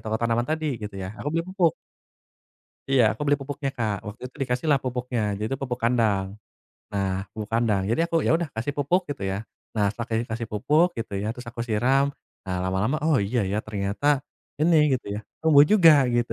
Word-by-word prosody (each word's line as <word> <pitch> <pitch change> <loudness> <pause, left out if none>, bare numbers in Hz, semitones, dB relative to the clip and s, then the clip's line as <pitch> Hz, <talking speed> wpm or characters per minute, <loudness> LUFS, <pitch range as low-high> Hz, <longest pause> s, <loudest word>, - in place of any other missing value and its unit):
toko 110 -1 -2
tanaman 115 +3 0
tadi, 155 -7 -2
gitu 105 -2 -6
ya. 95 +1 -5
Aku - - -2
beli 165 +2 -1
pupuk. 185 -3 +1 1.2
Iya, 135 -2 +5
aku - - -13
beli 145 0 +4
pupuknya, 140 0 -4
Kak. 110 -4 0
Waktu 105 +3 -8
itu, 125 - -15
dikasihlah 135 +3 +1
pupuknya. 125 -1 -2 0.2
Jadi 110 +4 -3
tuh, 135 - -2
pupuk 125 -2 -3
kandang. 110 -5 +2 0.7
Nah, 95 -1 -2
pupuk 105 -1 -6
kandang. 115 -4 +2
Jadi 115 - +1
aku 170 - -3
ya - - +3
udah, 170 - -2
kasih 115 +6 -2
pupuk, 145 +7 +2
gitu 135 -8 -6
ya. 95 - -2 0.4
Nah, 105 -2 +2
setelah 115 +2 -6
ke - - -3 0.2
kasih 115 0 -3
pupuk, 150 +11 +3
gitu 115 -3 -5
ya, 105 - -3
terus 125 -1 -10
aku 120 - -11
siram. 125 +5 +3 0.4
Nah, 90 - -1
lama-lama, 95 +9 0
"Oh, 155 -2 +3
iya 120 +5 0
ya, 105 - 0
ternyata, 100 +5 -3 0.5
ini," 165 +2 +4 0.2
gitu 125 - -7
ya, - - -3 0.2
"tumbuh 145 -3 +7
juga," 180 -6 +8 0.2
gitu. 120 -1 0
120 Hz, 200 wpm, -25 LUFS, 105-145 Hz, 1.2 s, juga